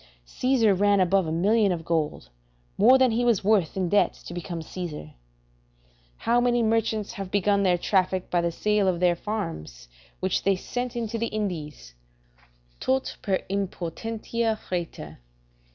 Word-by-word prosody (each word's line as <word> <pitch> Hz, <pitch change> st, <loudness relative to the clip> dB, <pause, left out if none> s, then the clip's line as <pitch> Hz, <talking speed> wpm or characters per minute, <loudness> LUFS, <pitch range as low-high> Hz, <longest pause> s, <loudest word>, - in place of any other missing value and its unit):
Caesar 240 Hz, -, +2 dB
ran 200 Hz, +1 st, +3 dB
above 185 Hz, -1 st, +2 dB
a -, -, -2 dB
million 200 Hz, +5 st, +3 dB
of 165 Hz, -2 st, -3 dB
gold, 155 Hz, -, -2 dB, 0.5 s
more 245 Hz, +6 st, +6 dB
than 260 Hz, -2 st, +4 dB
he 235 Hz, +2 st, 0 dB
was 235 Hz, -6 st, +2 dB
worth, 195 Hz, -4 st, +2 dB
in 185 Hz, -2 st, 0 dB
debt 205 Hz, +4 st, +3 dB
to -, -, -10 dB
become 175 Hz, -1 st, -5 dB
Caesar; 170 Hz, 0 st, -6 dB
and 75 Hz, -, -12 dB, 1.1 s
how 240 Hz, +1 st, +2 dB
many 240 Hz, -1 st, +2 dB
merchants 220 Hz, -1 st, 0 dB
have 195 Hz, -5 st, -6 dB
begun 200 Hz, +1 st, +2 dB
their 180 Hz, -2 st, +3 dB
traffic 185 Hz, 0 st, 0 dB
by 175 Hz, -, +2 dB
the 170 Hz, 0 st, 0 dB
sale 210 Hz, +3 st, +1 dB
of 180 Hz, -2 st, +1 dB
their 175 Hz, -1 st, +3 dB
farms, 80 Hz, -, -5 dB, 0.3 s
which 185 Hz, 0 st, 0 dB
they 195 Hz, 0 st, +2 dB
sent 245 Hz, +6 st, -4 dB
into 230 Hz, -1 st, -3 dB
the 230 Hz, -, 0 dB
Indies, 160 Hz, -, -5 dB, 0.9 s
"Tot 265 Hz, 0 st, -1 dB
per 190 Hz, -3 st, 0 dB
impotentia 215 Hz, +4 st, -2 dB
freta." 165 Hz, -, -5 dB
195 Hz, 155 wpm, -26 LUFS, 175-225 Hz, 1.1 s, more